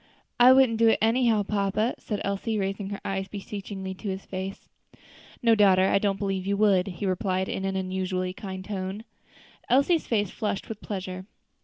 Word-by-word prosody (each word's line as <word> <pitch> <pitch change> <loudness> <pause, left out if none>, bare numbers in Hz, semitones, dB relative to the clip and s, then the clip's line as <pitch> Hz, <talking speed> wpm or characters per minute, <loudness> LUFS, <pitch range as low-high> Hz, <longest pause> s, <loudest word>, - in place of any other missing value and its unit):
"I 245 +1 +9
wouldn't 260 -4 +5
do 230 - +5
it 225 - +5
anyhow, 225 -1 +3
papa," 205 +3 0
said 210 -2 -4
Elsie, 200 +3 -2
raising 195 0 -2
her 200 - -5
eyes 195 0 -2
beseechingly 195 -1 -6
to 195 +2 -6
his 190 0 -5
face. 190 +1 -6 0.8
"No, 230 -1 +5
daughter, 195 -3 +5
I - - +3
don't 195 -1 0
believe 195 -1 -2
you 200 0 +1
would," 200 -3 +3
he 190 +1 -5
replied 185 0 0
in 190 - -3
an 195 0 -1
unusually 185 -1 -2
kind 190 -1 -7
tone, 195 +1 -4
and - - -40 0.6
Elsie's 280 +7 +3
face 205 -5 0
flushed 210 -3 -3
with 220 -2 -6
pleasure. 185 -2 -5
195 Hz, 180 wpm, -26 LUFS, 190-215 Hz, 0.8 s, I